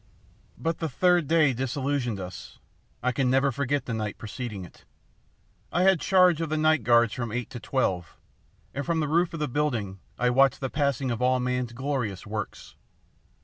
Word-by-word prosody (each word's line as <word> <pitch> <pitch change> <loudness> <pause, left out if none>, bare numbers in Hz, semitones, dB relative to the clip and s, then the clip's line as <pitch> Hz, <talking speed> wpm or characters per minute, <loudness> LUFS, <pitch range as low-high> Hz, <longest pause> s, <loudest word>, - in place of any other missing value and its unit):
"But 165 0 -2
the 160 - -2
third 175 +3 +3
day 155 -4 +4
disillusioned 130 -2 -2
us. 90 -1 -8 0.5
I 125 - +2
can 125 +1 +1
never 135 +2 +3
forget 140 0 -1
the 120 - -3
night 110 -2 -3
preceding 110 -4 -6
it. - - -17 0.9
I 175 - +2
had 190 -2 +5
charge 180 -3 +4
of 165 - -2
the 155 - 0
night 155 0 +3
guards 120 -2 +4
from 120 -3 -4
eight 120 +1 -4
to 120 - -6
twelve, 95 -10 -1 0.6
and 140 - -3
from 165 +2 0
the 155 - 0
roof 170 +3 +2
of 165 - -6
the 150 - 0
building 120 -9 -1 0.2
I 125 0 +2
watched 135 +1 +4
the 130 -2 -3
passing 140 -3 0
of 115 - -3
all 130 0 +3
man's 125 -1 -2
glorious 125 -7 -3
works. 105 0 -6
130 Hz, 185 wpm, -27 LUFS, 120-150 Hz, 0.9 s, had